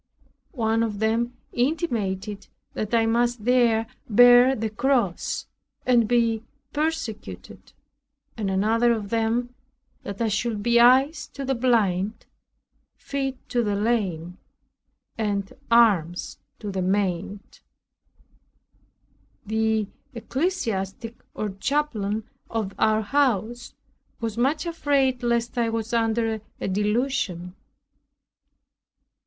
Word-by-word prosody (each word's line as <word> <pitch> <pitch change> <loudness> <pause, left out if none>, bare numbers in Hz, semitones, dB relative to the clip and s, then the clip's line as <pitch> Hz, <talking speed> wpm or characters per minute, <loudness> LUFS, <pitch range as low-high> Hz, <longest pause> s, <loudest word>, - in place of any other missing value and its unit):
One 225 -2 +1
of 220 -3 -1
them 230 +3 0 0.2
intimated 215 - -1 0.3
that 215 - -3
I 230 -1 +3
must 235 -1 +1
there 235 -3 +3 0.2
bear 245 +3 +7
the 220 -2 -3
cross 235 -5 0 0.4
and 240 -3 +4
be 230 -2 +2 0.3
persecuted; 230 - -4 0.6
and 210 -3 -2
another 225 +5 +3
of 210 -3 -5
them 230 +2 0 0.5
that 200 0 -7
I 230 - +1
should 215 0 -1
be 235 +1 +4
eyes 265 +6 +5
to 275 - -4
the 270 - +1
blind, 220 -5 +1 0.7
feet 270 -2 -3
to 240 - +1
the 205 -2 0
lame, 190 -6 -1 0.8
and 200 -2 -1 0.2
arms 200 -8 +3 0.2
to 210 -2 -5
the 190 -1 -2
maimed. 195 +1 -2 1.9
The 220 0 +1 0.3
ecclesiastic, 230 - -2 0.2
or 210 - -2
chaplain, 220 -6 -1 0.2
of 215 -4 -2
our 220 0 +3
house 240 -2 0 0.4
was 225 -2 -3
much 275 +7 +1
afraid 280 -6 +1
lest 235 0 0
I 230 -1 +2
was 225 0 -3
under 225 -1 +1 0.2
a - - -3
delusion. 205 -3 -1
225 Hz, 105 wpm, -24 LUFS, 205-245 Hz, 1.9 s, bear